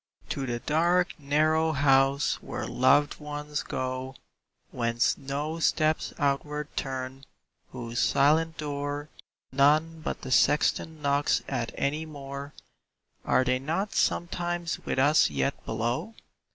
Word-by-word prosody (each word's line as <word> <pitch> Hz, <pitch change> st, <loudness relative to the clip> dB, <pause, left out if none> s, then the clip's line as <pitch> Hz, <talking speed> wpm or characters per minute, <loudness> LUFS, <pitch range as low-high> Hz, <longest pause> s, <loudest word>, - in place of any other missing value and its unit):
To 135 Hz, -1 st, -3 dB
the 120 Hz, -1 st, -1 dB
dark, 170 Hz, +7 st, +2 dB
narrow 155 Hz, +3 st, +2 dB
house 135 Hz, 0 st, +3 dB
where -, -, -5 dB
loved 145 Hz, +3 st, +3 dB
ones 150 Hz, 0 st, -4 dB
go, 130 Hz, +1 st, -4 dB, 0.6 s
Whence 115 Hz, 0 st, +1 dB
no 145 Hz, +4 st, -4 dB
steps 155 Hz, -1 st, +1 dB
outward 145 Hz, +1 st, -1 dB
turn, 130 Hz, 0 st, -4 dB, 0.5 s
whose 120 Hz, -2 st, -5 dB
silent 160 Hz, +4 st, +3 dB
door 145 Hz, 0 st, -4 dB, 0.4 s
None 155 Hz, +4 st, +3 dB
but -, -, -3 dB
the 130 Hz, -, -6 dB
sexton 150 Hz, +3 st, +2 dB
knocks 140 Hz, +1 st, +2 dB
at 120 Hz, -4 st, -2 dB
any 150 Hz, +3 st, -1 dB
more, 140 Hz, -1 st, -7 dB, 0.7 s
Are 130 Hz, -, +3 dB
they 130 Hz, 0 st, +1 dB
not 165 Hz, +9 st, -2 dB
sometimes 175 Hz, -1 st, -1 dB
with -, -, -2 dB
us 145 Hz, +4 st, +5 dB
yet 140 Hz, -, -2 dB
below? 120 Hz, -, -2 dB
145 Hz, 120 wpm, -27 LUFS, 135-155 Hz, 0.7 s, us